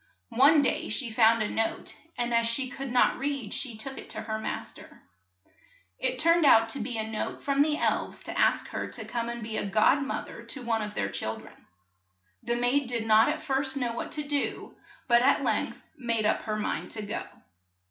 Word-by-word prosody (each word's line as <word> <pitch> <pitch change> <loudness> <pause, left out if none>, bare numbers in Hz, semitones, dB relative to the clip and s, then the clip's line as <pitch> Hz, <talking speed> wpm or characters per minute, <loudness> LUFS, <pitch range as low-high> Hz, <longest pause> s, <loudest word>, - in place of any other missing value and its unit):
One 280 +5 +5
day - - 0
she 245 -5 -2
found 225 0 +4
a - - -1
note, 225 +1 -2 0.2
and 240 -1 -1
as 230 0 +3
she 255 +3 0
could 270 -1 -6
not 250 - +3
read 275 -6 -3
she 240 -6 -3
took 270 +5 -6
it - - -11
to - - -5
her 220 0 -3
mas - - -4
ter. - - -15 1.0
It 255 0 0
turned 335 +3 +4
out 225 -5 +6
to 275 - -4
be 235 0 -3
a 220 - -1
note 220 -1 -4
from 280 0 +2
the 300 0 +2
elves - - -1
to - - -6
ask - - +2
her - - -4
to - - -5
come 235 -1 -3
and 235 -1 -5
be 220 0 -2
god 215 +7 +3
moth 275 - -3
er - - -10
to 270 - -7
one 225 -2 0
of 210 -1 -5
their - - -1
chil - - -3
dren. - - -16 0.7
The 235 - -1
maid 245 +3 +1
did 235 -2 -2
not 220 +3 +5
at 305 +1 -3
first 270 -1 -1
know 245 -3 -1
what 235 - -5
to 300 - -3
do, 290 -1 -3 0.3
but 240 -1 +5
at 270 +3 +3
length - - -1
made 230 -6 -1
up 215 - +2
her 215 -1 -1
mind 215 - -3
to 215 - -4
go. 210 +2 -4
240 Hz, 215 wpm, -28 LUFS, 225-275 Hz, 1.0 s, out